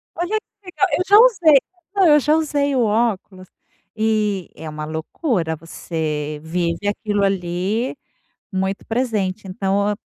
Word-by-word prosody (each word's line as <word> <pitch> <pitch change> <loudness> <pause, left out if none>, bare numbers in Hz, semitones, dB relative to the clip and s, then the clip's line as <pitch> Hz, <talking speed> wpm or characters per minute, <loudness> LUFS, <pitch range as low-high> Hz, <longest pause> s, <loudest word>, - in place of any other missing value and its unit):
Olha 355 +6 -1
que 415 -1 -39
legal, 370 +1 0
eu 360 - 0
já 405 +2 +7
usei, 360 - +6 0.4
não, 390 -3 +5
eu 300 -1 +7
já 300 +2 +2
usei 290 -3 0
o 250 - +3
óculos, 210 -4 -1 0.5
e 215 -4 0
é 160 0 -7
uma 150 0 -6
loucura, 160 - -2
você 155 -2 -4
vive 170 +3 -2
aquilo 205 0 -1
ali 195 +6 -1 0.6
muito 190 +1 -2
presente. 215 -5 -1
Então, 200 +2 0
205 Hz, 135 wpm, -20 LUFS, 180-280 Hz, 0.6 s, já